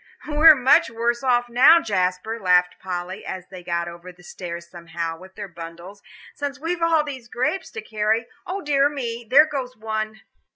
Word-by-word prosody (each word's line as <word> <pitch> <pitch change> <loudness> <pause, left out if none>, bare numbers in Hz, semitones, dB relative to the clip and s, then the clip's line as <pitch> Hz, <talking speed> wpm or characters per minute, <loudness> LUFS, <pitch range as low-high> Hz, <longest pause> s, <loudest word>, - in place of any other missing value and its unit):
"We 300 - -5
are 310 +1 +8
much 270 +5 +4
worse 235 +1 -1
off 245 -2 +2
now, 255 +8 +6
Jasper," 200 - -1
laughed 180 -2 +2
Polly, 185 +2 -5
as 185 -1 -7
they 185 -2 -10
got 170 -1 -2
over 170 +1 -9
the 180 0 -20
stairs 170 -1 -7
somehow 165 -1 -6
with 190 0 -15
their 205 -1 -6
burdens, 170 +3 -10 0.3
"since 285 -1 -5
we've 335 +3 -3
all 330 -2 +3
these 265 -5 -8
grapes 260 +10 -2
to 220 - -8
carry. 215 +1 0 0.2
O 390 +2 -3
dear 285 -1 +3
me, 240 -5 -5
there 295 +4 +7
goes 260 -5 -5
one!" 215 -1 -4
220 Hz, 180 wpm, -23 LUFS, 180-275 Hz, 0.3 s, are